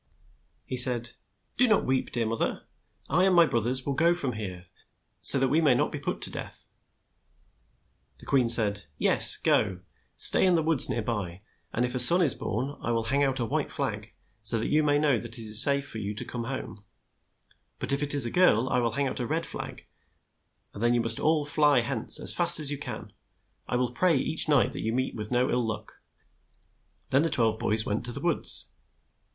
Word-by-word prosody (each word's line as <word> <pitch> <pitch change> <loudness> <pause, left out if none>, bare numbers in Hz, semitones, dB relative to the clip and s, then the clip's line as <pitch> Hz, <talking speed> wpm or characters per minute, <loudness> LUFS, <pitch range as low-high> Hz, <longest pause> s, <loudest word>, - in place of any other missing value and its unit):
He 130 - -6
said, 120 -1 +5 0.5
"Do 250 - +2
not 215 -3 +1
weep, 130 0 -2
dear 120 -2 -2
moth 115 +1 -4
er. - - -3 0.4
I 180 +6 +1
and 190 -1 +1
my 170 -1 +5
broth 115 -6 -2
ers 130 +1 -1
will 140 - -3
go 170 +5 +1
from 140 -7 -4
here, 95 -5 -8 0.6
so - - +5
that 135 -1 0
we 155 +5 +1
may 145 -6 +2
not - - -1
be - - -6
put - - -6
to - - +2
death." - - -10 1.5
The - - -13
queen 130 -4 0
said, 105 -3 +5
' 75 - -39
' - - -42
Yes, - - +2
go. 95 -1 -1 0.4
Stay - - +6
in 185 -2 +2
the 165 - 0
woods 155 -4 +4
near 115 - -3
by, 100 -5 -6 0.3
and 120 - -2
if 125 - -5
a 125 - -3
son 175 +7 +9
is 140 -8 +2
born, 130 +7 -5
I - - -5
will 115 -1 -2
hang 140 +5 -1
out 135 -1 -1
a 120 - -2
white - - -4
flag, - - -6 0.3
so 110 +2 +1
that 110 - -3
you 155 - +2
may 145 -1 0
know 145 -5 0
that 115 +1 -8
it - - -5
is 110 0 +6
safe 140 -1 +3
for 110 - -8
you 105 0 -6
to - - -4
come 120 -2 -7
home; 130 -5 -8 0.9
but - - -3
if 140 - -1
it 145 0 -2
is 140 -4 +6
a 120 - -4
girl, 130 -9 +2
I 125 - 0
will 115 -2 -2
hang 140 +2 -2
out 130 - -5
a 120 - -4
red 165 +2 -3
flag, - - -9 0.9
and 100 - -10
then 120 +1 +1
you 120 - 0
must 115 0 0
all 155 -1 0
fly 145 -3 +2
hence 120 -1 -2
as - - +3
fast 175 -1 +5
as 150 -2 0
you 145 - -6
can. - - -9 0.5
I - - -4
will 125 -1 -2
pray 170 +7 0
each 155 0 -1
night 145 -4 +2
that - - -8
you 110 - -3
meet 130 +1 -3
with 105 -1 -7
no 125 +1 0
ill 125 0 -1
luck." 110 -1 -8 1.1
Then 135 - +2
the 165 - -1
twelve 110 -5 0
boys 110 0 -1
went 105 +2 -4
to 120 - -3
the - - -7
woods. - - 0
125 Hz, 225 wpm, -25 LUFS, 115-145 Hz, 1.5 s, son